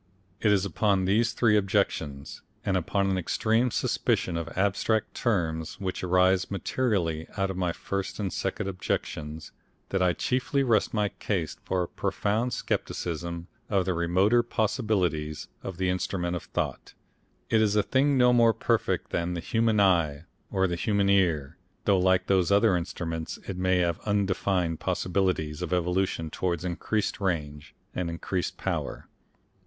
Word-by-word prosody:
It 105 - +3
is 100 -1 +3
upon 100 +1 +1
these 115 +5 +3
three 115 -2 +3
objections, 95 -8 -1 0.2
and 95 - +1
upon 95 +2 +1
an 95 - +1
extreme 115 +7 +1
suspicion 90 -5 0
of 85 -1 -3
abstract 100 +3 +1
terms 80 -6 -1
which 95 -2 -3
arises 90 +1 +3
materially 95 -5 -1
out 95 -1 0
of - - -6
my 90 -2 0
first 100 +4 -4
and 100 -3 -2
second 95 +1 -2
objections, 80 -4 -4 0.4
that 95 - 0
I 90 -1 +3
chiefly 130 +5 0
rest 115 -5 +2
my 105 -2 +1
case 90 -8 -3
for 90 -1 0
a - - -4
profound 110 +5 -1
scepticism 85 -4 -3 0.2
of 95 -3 +2
the 95 - +1
remoter 90 +7 +3
possibilities 100 - -1
of 95 - -6
the 95 0 0
Instrument 90 -1 -1
of 85 - -5
Thought. - - -4 0.6
It 110 - +4
is 105 -1 +2
a 105 - +4
thing 135 +5 +2
no 125 -1 +5
more 115 -2 +5
perfect - - 0
than 85 +1 -1
the - - -2
human 110 +4 +1
eye 85 -7 +3 0.3
or 95 0 +1
the 90 -2 0
human 100 +1 +1
ear, 85 -6 +2 0.3
though 100 -2 +4
like 95 0 +3
those 95 -1 +2
other 100 -2 +5
instruments 85 -2 -4
it 95 - -3
may 95 0 +2
have 85 -2 +1
undefined 95 -4 +1
possibilities 90 -5 -1
of 90 - -3
evolution 90 -2 0
towards 90 -2 -2
increased 100 +4 -1
range, 75 -6 -3 0.2
and 90 -2 -2
increased 85 +2 -3
power. - - -3
95 Hz, 155 wpm, -27 LUFS, 85-105 Hz, 0.6 s, no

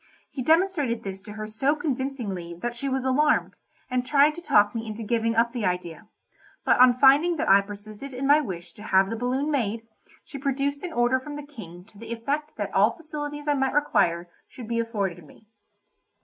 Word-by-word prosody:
He 265 - -5
demonstrated 310 -6 +1
this 195 -1 -6
to 210 +1 -10
her 215 0 -6
so 245 +8 0
convincingly, 250 - -4
that 240 +8 -4
she 275 +3 -4
was 265 -1 -1
alarmed, 290 +3 +1 0.3
and 250 -1 -1
tried 285 +3 +4
to 345 - -9
talk 205 -9 +3
me 225 -1 -4
into 215 +1 -6
giving 230 +1 0
up 230 +1 +3
the 240 -4 -3
idea, 180 -1 -3 0.6
but - - +3
on 250 -1 +7
finding 285 +6 +5
that 300 - -2
I 195 +1 +7
persisted 205 +6 -10
in 260 +1 -4
my 290 +2 +5
wish 175 - -7
to - - -14
have 195 -1 +2
the - - -2
balloon 255 +6 -1
made, 230 -5 -1 0.4
she 280 - -9
produced 280 +1 -1
an 360 - -5
order 245 -2 +2
from 290 +3 -8
the 295 -1 -7
King 185 - -11
to 210 -1 -19
the 230 +1 -9
effect 285 +7 -3
that - - -4
all - - +3
facilities 295 -2 -6
I 295 - +3
might 270 -1 0
require 175 -12 +2 0.2
should 240 -4 -10
be 230 0 -1
afforded 200 -7 -2
me. 155 - -19
245 Hz, 205 wpm, -25 LUFS, 210-285 Hz, 0.6 s, on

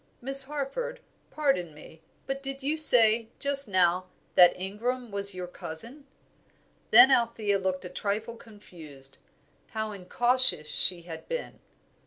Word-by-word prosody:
"Miss 270 +2 +4
Harford, 300 - -5 0.3
pardon 225 - -1
me, 160 +1 -15 0.2
but 270 0 -4
did 270 0 -6
you 295 +3 0
say, 230 -7 +4
just 280 -2 -1
now, 185 -1 +1 0.3
that 180 0 +5
Ingram 230 +5 -4
was 200 -1 +3
your 180 -1 -5
cousin." 230 - -9 0.8
Then 245 +4 +8
Althea 230 -5 +1
looked 185 -1 -3
a - - -6
trifle 215 +5 -4
confused. 160 - -11 0.6
How 220 0 -2
incautious 240 -1 +1
she 175 +2 +1
had 165 -2 -10
been! - - -5
220 Hz, 130 wpm, -27 LUFS, 185-270 Hz, 0.8 s, Then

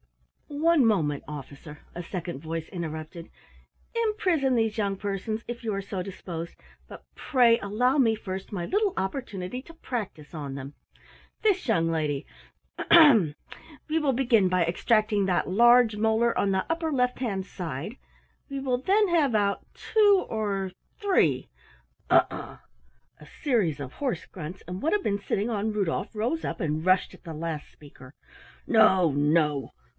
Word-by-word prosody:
"One 305 -1 +3
moment, 155 -10 +1
Officer," 150 +1 -9 0.2
a 175 - -5
second 175 -4 -5
voice 165 0 -4
interrupted. 165 -1 -6 0.7
"Imprison 375 - +1
these 225 -2 0
young 200 -2 -1
persons, 205 +3 -3
if 240 0 -6
you 220 -2 -2
are 195 - -2
so 195 -1 -5
disposed, 175 -3 -7 0.3
but - - -11
pray 245 -5 +4
allow 245 +7 +1
me 230 -5 +4
first 190 -2 -6
my 180 -4 -3
little 410 - +1
opportunity 195 +1 -4
to 330 - -14
practise 210 - -6
on 145 -4 -5
them. 135 +1 -7 0.7
This 395 -7 +1
young 165 -8 +2
lady 155 -3 -1 0.5
ahem! 230 - +6 0.5
We 320 +1 +1
will 295 -3 +1
begin 235 -7 +3
by 180 -2 +2
extracting 210 +3 +1
that 180 -1 0
large 240 +2 +5
molar 225 +2 +2
on 200 - +2
the 190 0 0
upper 330 -1 -1
left 250 -3 0
hand 200 -7 -2
side, 170 - -6 0.5
we 275 0 -4
will 255 -2 -1
then 400 +9 +3
have 310 -7 +2
out 200 -1 0
two 410 -3 +3
or 200 -4 -2 0.3
three 405 -3 +2 0.3
" - - -38
"Ugh - - +6
ugh!" - - -8 0.6
A - - -13 0.2
series 210 - +1
of 135 -1 -7
hoarse 270 -4 -3
grunts, 180 0 -9
and 180 +1 -5
what 320 - +1
had 415 -2 +1
been 200 0 0
sitting 200 +2 -2
on 215 -1 -1
Rudolf 200 0 -2
rose 240 +10 -1
up - - -4
and 155 -3 -2
rushed 185 0 +3
at - - -16
the 165 -3 -7
last 160 -1 -5
speaker. 140 -3 -15 0.5
"No, 190 -7 +5
no! 150 0 +1
205 Hz, 160 wpm, -27 LUFS, 170-250 Hz, 0.7 s, ahem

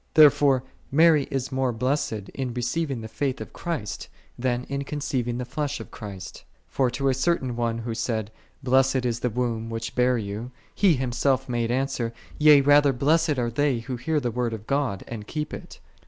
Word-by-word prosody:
Therefore 145 -4 +6 0.3
Mary 155 -1 +5
is 135 0 -2
more 130 -1 +1
blessed 115 -4 -1
in 130 -3 -4
receiving 125 +1 -1
the 110 - -6
faith 135 +3 -2
of - - -8
Christ, 160 -11 -4 0.3
than 125 0 -1
in 140 +1 -3
conceiving 135 -5 -2
the 125 - -3
flesh 140 +3 -3
of - - -9
Christ. 100 -4 -8 0.2
For 130 -2 +1
to 135 +3 0
a - - +3
certain 130 -2 0
one 115 -1 -1
who 115 0 -4
said, 110 -2 -2 0.2
" - - -34
Blessed 130 0 +3
is 120 -1 0
the 125 - 0
womb, 115 -1 -2
which 115 0 -4
bare 125 0 +3
Thee,'1 105 +2 -4
2 125 - -11 0.2
He 190 -6 +4
Himself 130 +1 0
made 120 -2 -1
answer, 125 -2 -1
" - - -19
Yea, 150 -2 +8
rather, 145 0 +5
blessed 155 +3 +2
are 120 -1 0
they 135 -1 +1
who 125 +2 -5
hear 150 +6 0
the 125 -4 -2
Word 120 0 -1
of 110 -1 -7
God, 135 -8 -1
and 105 -3 -7
keep 150 -1 -4
it.' - - -9
125 Hz, 200 wpm, -25 LUFS, 120-140 Hz, 0.3 s, Yea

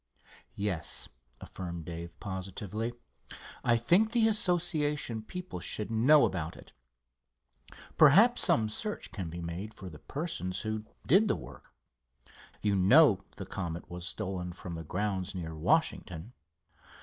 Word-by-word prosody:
"Yes," 95 -6 -1 0.3
affirmed 85 -3 -7
Dave, 85 0 -7
positively. 100 +4 -4 0.7
"I 120 -1 +4
think 185 - +3
the 230 -2 +4
Association 165 - +1
people 180 +10 -7
should 105 +1 -1
know 135 +7 +6
about 80 -3 -3
it. - - -15 1.3
Perhaps 200 - +7
some 110 -1 +4
search 210 - -4
can 95 -6 -5
be 85 +2 -6
made 85 +6 -5
for 95 - -8
the 75 - -11
persons 135 - -3
who 110 -1 -3 0.2
did 195 +9 +5
the 210 - +2
work. - - -12 0.9
You 105 -1 +2
know, 105 - +6
the - - -6
Comet 85 -1 -5
was 90 0 -4
stolen 90 -2 -3
from 85 0 -8
the 80 0 -5
grounds 95 +2 -2
near 80 -3 -5
Washington." 90 - 0
105 Hz, 130 wpm, -31 LUFS, 90-150 Hz, 1.3 s, Perhaps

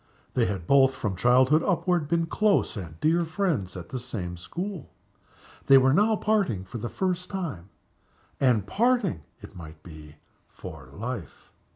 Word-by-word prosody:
They 120 -3 +2
had 95 -4 -4
both, 135 +3 +4
from 105 -5 -3
childhood 130 - +4
upward, 180 -4 0
been 165 +1 +1
close 205 0 +1
and 85 -6 -8
dear 170 +2 +2
friends 160 - -2
at 85 -2 -9
the 130 - -4
same 100 -8 -5
school. 175 - -6 0.8
They 135 - +8
were 130 0 +4
now 210 +6 +3
parting 200 - 0
for 120 +5 -7
the 120 - -4
first 180 -1 -2
time 150 - -5 0.7
and 120 -7 +2
parting, 240 - +1 0.2
it - - -12
might 80 -3 -11
be, 75 -2 -12 0.3
for - - -11
life. - - -7
130 Hz, 155 wpm, -26 LUFS, -, 0.8 s, They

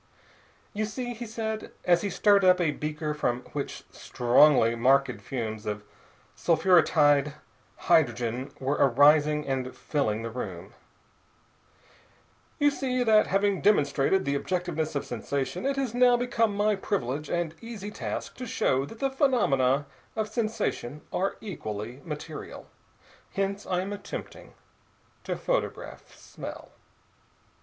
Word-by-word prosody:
"You 215 +1 -1
see," 245 +3 -4
he 235 0 -7
said, 220 0 -4
as 175 -1 +4
he 205 - -2
stirred 200 +1 +4
up 185 0 +5
a 165 -4 +2
beaker 150 +1 -3
from 125 -4 -1
which 145 -1 -4
strongly 120 -1 +4
marked 135 +4 +2
fumes 110 -5 -5
of 105 0 -3 0.5
sulphuretied 155 -4 +4 0.5
hydrogen 125 -5 +2
were 135 +2 -1
arising 150 +3 +4
and 130 -2 -3
filling 115 -7 -1
the 115 - -4
room, 95 -4 -6 1.8
"you 290 -1 +4
see 255 -2 -1
that, 215 -2 +5
having 200 0 +1
demonstrated 155 -1 +2
the 140 - 0
objectiveness 160 0 -2
of 140 - -2
sensation, 140 - -3
it 275 - 0
has 270 -4 -2
now 245 0 +5
become 230 -3 0
my 210 0 +2
privilege 150 - -3
and 170 -2 -1
easy 220 -3 -7
task - - -5
to 255 - -6
show 135 -10 +1
that 225 - -11
the 270 +3 -1
phenomena 145 - +2 0.3
of 220 -1 -1
sensation 215 - -2
are 195 +2 0
equally 120 - -6
material. 155 -1 -7 0.7
Hence 195 +1 -2
I 180 -1 0
am 195 +2 -4
attempting 205 0 -8 0.7
to - - -2
photograph - - -3
smell." - - -9
160 Hz, 130 wpm, -27 LUFS, 135-215 Hz, 1.8 s, up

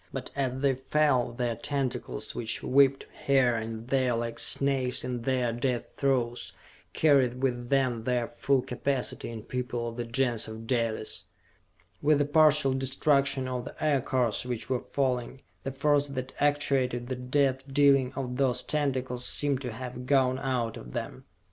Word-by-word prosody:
But - - -5
as 130 -2 -1
they 140 -1 +3
fell, 130 -1 +1
their 120 -1 -2
tentacles, 140 0 -3
which 110 -2 -3
whipped 135 0 +3 0.2
here 135 -3 +4
and 115 0 -5
there 130 -3 +2
like 115 0 -3
snakes 135 -2 +1
in 125 -1 -3
their 125 -1 0
death 120 0 -2
throes, 125 -3 0 0.4
carried 135 -4 +3
with 120 -2 -1
them 130 -4 +1
their 125 -2 0
full 135 -1 0
capacity 130 0 -3
in 115 -2 -7
people 120 -1 -3
of 115 - -10
the 120 - -2
Gens 120 -1 0
of 110 +1 -8
Dalis! 115 -3 -2 0.8
With 150 0 +4
the 145 - +2
partial 150 -2 +5
destruction 135 0 +1
of 125 -1 -3
the - - -9
Aircars 130 -6 +1
which 125 0 -4
were 125 - +1
falling, 130 -1 -2 0.2
the 135 - -4
force 145 +1 +2
that 130 -2 -5
actuated 135 -4 +1
the 130 +1 -3
death 130 +1 0
dealing 135 -2 +4
of 125 -2 -4
those 125 -2 +2
tentacles 130 -4 -1
seemed 140 0 +2
to 125 -3 -4
have 125 +1 -7
gone 130 -2 +3
out 125 -4 -2
of - - -10
them. - - -5
130 Hz, 160 wpm, -28 LUFS, 120-135 Hz, 0.8 s, partial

